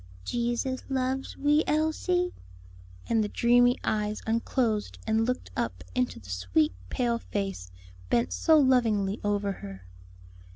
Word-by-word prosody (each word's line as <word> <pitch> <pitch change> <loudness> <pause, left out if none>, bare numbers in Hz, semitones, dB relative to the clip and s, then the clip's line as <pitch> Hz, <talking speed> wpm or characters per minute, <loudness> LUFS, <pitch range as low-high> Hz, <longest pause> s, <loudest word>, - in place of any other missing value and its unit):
"Jesus 240 +2 -1
loves 265 0 -2
wee 295 +2 +3
Elsie?" 335 +4 +1 0.7
and 225 -2 +2
the - - -1
dreamy 245 +3 +4
eyes 210 0 -1
unclosed 225 -1 0
and 220 +1 +1
looked 250 - -3
up 90 0 -3
into 125 +4 -1
the 95 -2 -11
sweet 90 +11 +1 0.2
pale 235 -2 0
face 195 - -4 0.4
bent 95 -6 +1
so 315 - +4
lovingly 225 -7 +3
over 205 -1 0
her. 95 - -9
225 Hz, 125 wpm, -28 LUFS, 195-260 Hz, 0.7 s, dreamy